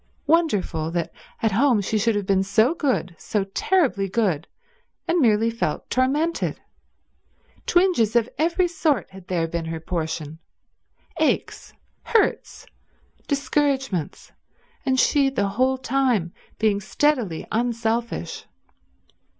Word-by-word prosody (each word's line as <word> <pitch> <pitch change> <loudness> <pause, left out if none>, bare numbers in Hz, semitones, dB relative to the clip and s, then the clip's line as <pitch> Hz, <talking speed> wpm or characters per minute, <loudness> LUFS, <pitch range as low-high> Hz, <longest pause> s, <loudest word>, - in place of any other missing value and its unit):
Wonderful 210 - +1
that 170 -1 -2 0.3
at 225 - +3
home 240 +2 +3
she 210 +2 -1
should 225 +1 +2
have 205 -1 -1
been 190 0 +2
so 220 +8 +3
good, 260 - -1
so 210 -2 -1
terribly 200 - +1
good, 185 -7 0 0.6
and 340 +1 +2
merely 225 -4 +3
felt 230 - -3
tormented. 290 +6 0 1.1
Twinges 350 - +3
of 235 -1 +3
every 345 +3 +2
sort 315 - 0
had 190 -1 -13
there 170 -3 0
been 165 0 -3
her 165 0 -4
portion; 160 -2 -4 0.8
aches, - - -1 0.3
hurts, 450 -2 0 0.6
discouragements, 275 - -1 0.6
and 260 0 +2
she 280 +1 +3
the 205 -7 -1
whole 255 +6 +1
time 250 -9 0 0.2
being 210 -2 +1
steadily 235 - 0
unselfish. 230 0 -2
230 Hz, 115 wpm, -23 LUFS, 195-275 Hz, 1.1 s, at